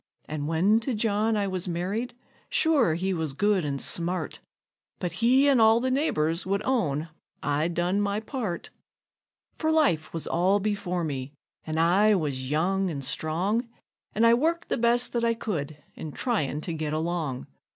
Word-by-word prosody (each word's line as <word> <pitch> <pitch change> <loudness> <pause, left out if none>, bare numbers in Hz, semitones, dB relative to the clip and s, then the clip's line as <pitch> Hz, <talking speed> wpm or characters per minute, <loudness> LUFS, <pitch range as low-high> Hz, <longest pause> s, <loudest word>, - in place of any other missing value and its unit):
And 150 -1 -4
when 185 +7 +3
to 235 +1 -2
John 215 0 +1
I 205 - +1
was 185 -1 -3
married, 190 +8 -3 0.3
sure 280 - +3
he 190 +3 -1
was 160 -5 -2
good 205 +3 +2
and 140 -2 -2
smart, 175 +5 -2 0.6
But 180 -2 -3
he 255 +4 +3
and 270 -4 +4
all 220 +1 +6
the 255 +2 0
neighbors 170 - +1
would 200 +2 -1
own 165 - 0 0.3
I 145 +2 +1
done 175 +3 0
my 205 0 0
part; 220 -6 -4 0.9
For 315 0 +1
life 280 - +2
was 165 - -3
all 185 +4 +2
before 200 -4 -2
me, 140 -3 -4 0.3
an' 155 0 -3
I 195 +6 +4
was 135 -7 -2
young 185 +5 +1
an' 140 -4 -4
strong, 185 - -1 0.5
And 225 +3 +3
I 230 - +7
worked 330 +7 0
the - - 0
best 240 +1 +3
that 235 -1 0
I 230 0 +2
could 155 -10 -4 0.2
in 155 -2 -7
tryin' 150 - -1
to 170 - -4
get 155 -1 -3
along. 155 -5 -2
185 Hz, 170 wpm, -27 LUFS, 160-225 Hz, 0.9 s, I